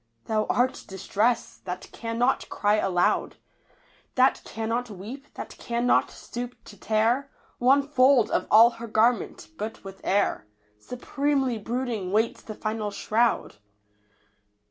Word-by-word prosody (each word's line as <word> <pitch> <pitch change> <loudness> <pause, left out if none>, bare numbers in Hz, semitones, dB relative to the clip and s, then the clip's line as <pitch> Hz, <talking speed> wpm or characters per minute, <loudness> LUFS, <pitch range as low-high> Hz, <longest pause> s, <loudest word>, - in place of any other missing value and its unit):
Thou 215 -1 0
art 250 +1 +1
Distress 210 +5 -1
— - - -40
^that 180 0 -6
cannot 235 +3 -1
cry 210 +1 +2
alou<^ 180 -3 +1 0.8
That 260 +1 +4
cannot 230 +2 -3
weep, 225 +9 -9
that - - -7
cannot 240 +1 +1
stoop 245 +1 -7
to 205 - -13
tear 225 +7 +1 0.3
One 275 +3 +4
fold 260 -5 +4
of - - 0
all 230 +2 +8
her 235 - -5
garment, 225 +2 +1
but 220 +1 -5
with 195 0 -10
air 190 - +1 0.3
Supremely 265 - -1
brooding 230 -4 -3
waits 220 +3 +1
the 215 - -8
final 215 -1 -3
shroud 220 - 0
230 Hz, 125 wpm, -26 LUFS, 210-250 Hz, 0.8 s, all